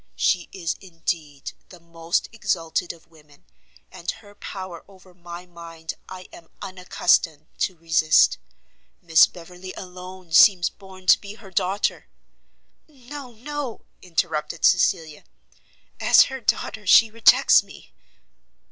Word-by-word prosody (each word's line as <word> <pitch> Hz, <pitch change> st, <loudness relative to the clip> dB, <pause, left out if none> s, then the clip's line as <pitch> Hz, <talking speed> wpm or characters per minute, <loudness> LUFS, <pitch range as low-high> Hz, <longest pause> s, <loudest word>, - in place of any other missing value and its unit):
She 170 Hz, -, 0 dB
is, 170 Hz, -4 st, -3 dB
indeed, 165 Hz, -5 st, -5 dB, 0.2 s
the 180 Hz, -, -14 dB
most 165 Hz, 0 st, -2 dB
exalted 170 Hz, -6 st, -2 dB
of 165 Hz, -1 st, -18 dB
women, 150 Hz, -3 st, -22 dB, 0.5 s
and 170 Hz, -, -7 dB
her 210 Hz, -2 st, -7 dB
power 185 Hz, -4 st, -8 dB
over 190 Hz, -2 st, -19 dB
my 175 Hz, 0 st, -10 dB
mind 165 Hz, -2 st, -9 dB, 0.2 s
I 185 Hz, -1 st, -10 dB
am 165 Hz, -, -14 dB
unaccustomed 180 Hz, -4 st, 0 dB
to 185 Hz, -, -1 dB
resist. 160 Hz, -, +3 dB, 0.6 s
Miss 165 Hz, -1 st, +5 dB
Beverley 180 Hz, +2 st, -11 dB
alone 180 Hz, -1 st, -10 dB
seems 180 Hz, 0 st, +6 dB
born 190 Hz, -2 st, -15 dB
to -, -, +5 dB
be 205 Hz, 0 st, -9 dB
her 200 Hz, -4 st, -15 dB
daughter 190 Hz, +2 st, -1 dB, 0.5 s
" -, -, -46 dB
"No, 275 Hz, -2 st, -11 dB
no," 275 Hz, +1 st, -6 dB, 0.2 s
interrupted 165 Hz, -2 st, -2 dB
Cecilia, 165 Hz, -4 st, +2 dB, 0.8 s
"as -, -, +6 dB
her 265 Hz, -1 st, -6 dB
daughter 210 Hz, -2 st, -2 dB
she 225 Hz, +3 st, +6 dB
rejects 230 Hz, 0 st, +5 dB
me!" -, -, -16 dB
180 Hz, 125 wpm, -23 LUFS, 165-195 Hz, 0.8 s, seems